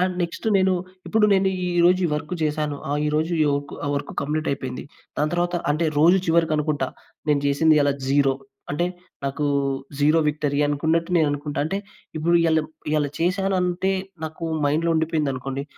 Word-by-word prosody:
And 185 0 +1
next 170 +5 -5
నేను 190 0 +3 0.3
ఇప్పుడు 220 -1 +3
నేను 190 0 +3 0.3
ఈరోజు 180 +2 +5
ఈ - - -2
వర్క్ 150 +2 -4
చేశాను. 150 -1 -1
ఆ! - - 0
ఈరోజు 155 +3 0 0.3
ఒక్ 145 - -10 0.2
వర్క్ 140 - -4
కంప్లీట్ 155 +2 -2
అయిపోయింది. 130 -2 -4 0.3
దాని 150 +1 +1
తరువాత 175 0 0
అంటే 155 +3 +1
రోజు 175 +5 +6
చివరికనుకుంటా 155 -2 +1 0.4
నేను 145 -1 +3
చేసింది 155 +3 +4
ఇయాళ 145 -1 +3 0.2
0 135 -1 +3 0.4
అంటే 175 +5 0 0.4
నాకు 140 +2 -2 0.6
0 150 +3 +4
విక్టరీ 145 -1 -1
అనుకున్నట్టు 160 +4 0
నేను 160 -2 +4
అనుకుంటా. 145 0 -4
అంటే 195 +6 -1 0.4
ఇప్పుడు 170 +2 +1
ఇయళ, 160 -1 +3 0.3
ఇయళ 150 -1 +2
చేశాను 190 +2 +1
అంటే 180 +2 0 0.3
నాకు 160 +2 -6 0.2
మైండ్‌లో 160 +3 +1
ఉండిపోయిందనుకోండి. 140 -4 -1
155 Hz, 150 wpm, -23 LUFS, 145-170 Hz, 0.6 s, రోజు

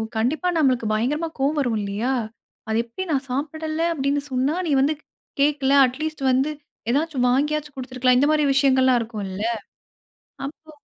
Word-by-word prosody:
கண்டிப்பா 275 +11 0
நம்மளுக்கு 255 -6 +2
பயங்கரமா 295 +9 0
கோவம் 290 +3 +1
வரும் 240 -5 0
இல்லையா? 205 +6 -2 0.6
"அது 220 +1 +2
எப்டி 235 +11 -6
நான் 275 -2 0
சாப்பிடல 310 +4 -3
அப்டின்னு 280 -1 0
சொன்னா, 260 +5 +1
நீ - - 0
வந்து 295 +3 +3 0.5
கேக்கல. 280 -2 +2 0.2
அட்லீஸ்ட் 305 +2 -5
வந்து 265 +4 +2 0.4
ஏதாச்சும் 280 -3 +1
வாங்கியாச்சும் 295 +2 0
குடுத்துருக்கலாம்" 255 -1 +1
இந்த 285 +3 +3
மாரி 300 -1 +3
விஷயங்கள்லாம் 260 -2 +4
இருக்கும்ல்ல. 210 -3 -5 1.0
அப்போ 315 +2 -11
270 Hz, 140 wpm, -23 LUFS, 250-300 Hz, 1.0 s, விஷயங்கள்லாம்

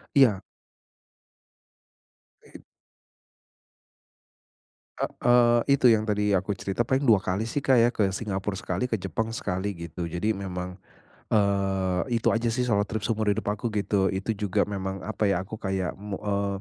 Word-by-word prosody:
Iya. 115 -9 +5 2.1
It - - -14 2.4
E - - 0
eee, 120 -1 +4 0.2
itu - - +4
yang 110 -1 +2
tadi 105 -2 +1
aku 95 +2 0
cerita 95 +4 -1
paling 130 +3 0
2 110 -4 +6
kali 100 +4 -1
sih, 140 +4 -2
Kak, 130 -3 +4
ya 115 - +5
ke 100 -3 +2
Singapore 95 -1 -3
sekali 125 - -2
ke 110 - 0
Jepang 95 +5 -3
sekali 100 -3 -2
gitu. 85 +1 -6
Jadi 105 +6 0
memang, 90 -2 -5 0.6
eee, 95 -3 +1 0.2
itu 115 - +2
aja 115 +1 0
sih 125 +2 0
solo 105 -4 +1
trip 110 0 -4
seumur 110 -2 0
hidup 105 +2 0
aku, 105 +3 -2
gitu. 100 -1 +1
Itu 95 +4 -2
juga 100 -2 0
memang 95 -1 -4
apa 110 0 -1
ya 90 -2 +1
aku 110 +3 -8
kayak 95 -3 -2
mo 100 0 -5
eee, 100 -1 -1
100 Hz, 155 wpm, -26 LUFS, 95-110 Hz, 2.4 s, 2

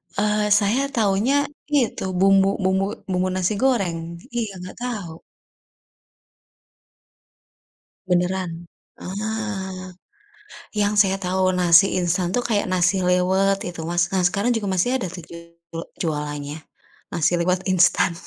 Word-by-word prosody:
Eee, 210 +1 +1
saya 215 +6 +1
taunya 215 +4 +2 0.4
itu, 245 -5 0 0.2
bumbu 195 0 +5 0.2
bumbu 190 +1 +2 0.3
bumbu 185 0 +1
nasi 185 +3 0
goreng. 200 -11 +1 0.4
Iya, 230 -3 -1
enggak 180 +1 -9
tahu. 215 -9 -4 2.9
Beneran? 180 -1 -1 0.3
Ah. 195 -2 -4 0.8
Yang 205 0 +1
saya 195 0 -1
tahu 185 +1 +1
nasi 180 +1 +5
instan 175 0 0
tuh 245 - +1
kayak 210 -3 +1
nasi 185 +1 +2
liwet 190 +2 +2
itu, 170 -2 -6
Mas. 175 +1 0
Nah, 190 -2 0
sekarang 200 +7 +1
juga 210 -3 -2
masih 245 +8 +1
ada 210 -8 -4
tuh 180 -1 -8
ju - - -9 0.7
jualannya, 150 -2 -3 0.5
Nasi 170 0 +1
liwet 180 +2 0
instan. 180 -1 +3
185 Hz, 120 wpm, -22 LUFS, 180-205 Hz, 2.9 s, bumbu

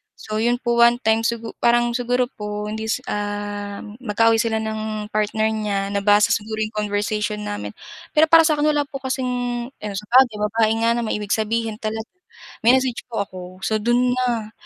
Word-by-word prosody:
So 215 0 -5
'yon 240 +2 +2
po 235 0 +1
one 235 +1 +6
time 220 0 +2
sigur 230 -1 -4
parang 240 0 +3
siguro 245 +1 +1
po 210 0 -4
hindi 220 +1 -4 0.2
um, 205 0 -4
mag-kaaway 225 +1 +3
sila 225 -2 0
ng 215 -1 -4
partner 215 +1 +1
niya 200 -2 -2
nabasa 205 +1 +4
siguro 215 +1 -1
'yong 215 0 -3
conversation 210 +1 -2
namin 205 0 -5 0.4
pero 310 +1 +6
para 330 0 +8
sa 310 - +3
akin 295 - +1
wala 290 -1 +1
po 275 -2 -7
kasing 260 -1 -1 0.4
ano 210 -6 -7
sa 210 - -5
bagay 250 -4 +5
babae 220 +1 +2
nga 230 - +3
na - - 0
may 215 - -1
ibig 205 -1 -2
sabihin 220 0 -1 0.9
mine-message 255 +1 +2
po 205 - 0
ako 185 - -10 0.2
so 220 - 0
do'n 240 +3 +2
na, 235 -4 -1
220 Hz, 175 wpm, -22 LUFS, 210-240 Hz, 0.9 s, para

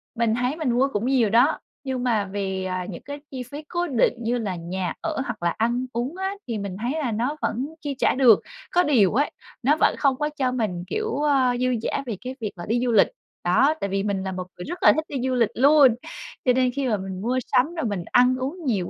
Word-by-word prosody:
mình 230 -2 +1
thấy 250 +4 0
mình 310 -6 -1
mua 255 +3 +3
cũng 210 +3 -1
nhiều 255 -5 +3
đó, 245 +8 +4 0.2
nhưng 260 -2 -3
mà 225 -5 +1
vì, 190 -1 -3
à, 185 -1 -3
những 175 - -7
cái 285 +2 -7
chi 255 -2 -5
phí 290 +5 -9
cố 350 0 -1
định 250 -6 +2
như 240 +2 0
là 200 -6 -3
nhà 175 +1 -3
ở 320 -4 -2
hoặc 230 -8 -5
là 170 - +3
ăn 240 +3 0
uống 245 +7 -2
á 385 +1 -2
thì 230 -3 -2
mình 200 -2 -5
thấy 245 +2 -1
là 250 -6 -1
nó 245 +7 -1
vẫn 255 +5 -1
chi 285 -3 -3
trả - - +3
được. 250 -6 +6 0.3
Có 355 0 +4
điều 230 - +3
ấy 285 +6 +1 0.3
nó 285 +5 +4
vẫn - - +4
không 275 -2 +3
có 300 0 -1
cho 260 -2 +1
mình, 210 -8 -2
kiểu, 435 -8 -2
a, 265 -4 +3
dư 255 +1 +1
dả - - -2
về 220 -6 -4
cái 255 +1 -6
việc 210 - -2
mà 175 - -6
đi 230 +3 +1
du 240 - +1
lịch, 220 - +6 0.4
đó, 295 +3 +4
tại 200 - -1
vì 195 +1 -1
mình 200 -2 -1
là 190 - -3
một 185 -1 -5
người 180 - -7
rất 350 +2 -6
là - - +8
thích 315 0 -2
đi - - -7
du - - 0
lịch 230 -3 +3
luôn, 275 -2 +6 0.5
cho 250 - +5
nên 255 0 +2
khi 270 +1 -2
mà 215 - +1
mình 190 -1 -6
mua 250 +4 0
sắm 290 +7 +2
rồi 320 -7 -2
mình 200 -5 -2
ăn 250 +1 +5
uống 300 +7 -4
nhiều 200 -9 0
245 Hz, 255 wpm, -24 LUFS, 205-275 Hz, 0.5 s, là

